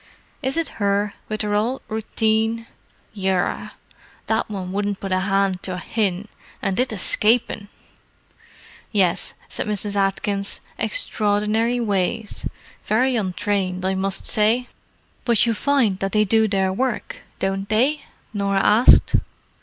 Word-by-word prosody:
"Is 265 +2 -1
it 330 -3 0
her, 200 0 +1 0.2
with 215 0 -2
her 210 0 -1
ould 230 +6 0
routheen? 220 +1 0 0.5
Yerra, 190 -2 -1 0.5
that 220 0 0
one 190 -3 -5
wouldn't 205 0 -1
put 195 - -5
a 185 - +2
hand 195 -1 +1
to 185 - -4
a - - -4
hin, 200 0 -1 0.3
and 195 +1 -1
it 255 -1 +1
eshcapin'!" 215 +1 +1 1.2
"Yes," 190 -4 +1
said - - -4
Mrs. 205 -1 -3
Atkins. 200 0 0 0.2
"Extraordinary 220 - +1
ways. 210 0 -1 0.4
Very 250 +4 +2
untrained, 185 -2 -1
I 190 - +1
must 190 0 -1
say." 225 +4 +3 0.6
"But 235 -2 +3
you 230 - +2
find 235 -6 +1
that 195 0 -2
they 215 0 +4
do 220 +2 +3
their 190 -2 +1
work, 250 +2 -2 0.2
don't 195 +1 -2
they?" 260 +8 +2 0.3
Norah 200 -1 +1
asked. 220 +4 +6
205 Hz, 130 wpm, -22 LUFS, 195-225 Hz, 1.2 s, asked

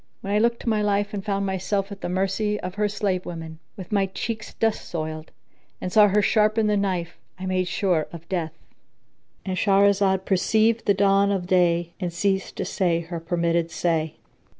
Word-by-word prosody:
When 200 - -3
I 210 - +3
looked 235 +1 +1
to - - -11
my 215 -1 +1
life 205 0 0
and 200 -2 -4
found 200 -1 -1
myself 195 +1 -1
at 200 - -8
the - - -3
mercy 195 +3 0
of 180 0 -5
her 210 +1 0
slave 195 -3 -1
women, 160 -2 -7 0.2
with 185 0 -9
my 200 -2 +2
cheeks 215 +3 -5
dust 225 -1 -1
soiled, 155 -1 -5 0.5
and 185 - -4
saw 210 -1 +7
her 205 +1 +2
sharpen 215 +1 +3
the 210 0 +2
knife, 185 -4 -2 0.2
I 185 - -6
made 185 -1 0
sure 175 -5 0
of 170 -1 -10
death.—And 175 +2 -8
Shahrazad 195 -1 +3
perceived 220 +4 +2
the 200 - +4
dawn 200 0 +3
of 190 -3 -1
day 175 -2 +2
and 180 -2 -2
ceased 190 +2 -1
to - - -3
say 175 -3 0
her 170 0 -6
permitted 170 0 0
say. 160 -2 -1
190 Hz, 185 wpm, -24 LUFS, 175-205 Hz, 0.5 s, saw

